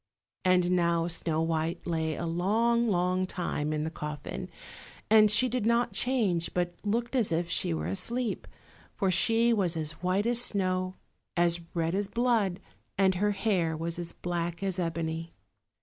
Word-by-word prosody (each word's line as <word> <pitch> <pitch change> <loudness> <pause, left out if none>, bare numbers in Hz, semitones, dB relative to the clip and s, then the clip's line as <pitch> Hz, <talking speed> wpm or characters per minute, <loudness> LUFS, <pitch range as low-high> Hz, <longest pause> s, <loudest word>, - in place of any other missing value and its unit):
And 180 -1 +3
now 170 -2 +2
Snow 165 -2 -1
white 165 0 -1
lay 160 -2 -1
a 170 - -4
long, 225 +8 +2
long 185 -1 +1
time 155 -5 -2
in 150 0 -1
the 160 - -3
coffin, 150 -1 -6 0.6
and 215 -1 +7
she 235 +5 +5
did 250 -1 -1
not 235 +2 +2
change, 205 -10 0
but 175 -1 0
looked 235 +4 -1
as 230 -8 +1
if 170 +1 -1
she - - 0
were 80 -1 -2
asleep; 230 - -1 0.5
for 190 -2 +1
she 230 +5 +3
was 180 -6 +1
as 155 -1 -1
white 185 +3 +1
as 240 0 +2
snow, 185 -4 0 0.4
as 170 0 +2
red 165 0 0
as 200 +1 0
blood, 225 -5 +1 0.4
and 190 -1 +4
her 205 +3 +1
hair 185 -6 0
was 165 +1 -3
as 170 -1 -4
black 170 0 -3
as 190 -1 -1
ebony. 165 -1 -3
180 Hz, 165 wpm, -29 LUFS, 165-210 Hz, 0.6 s, and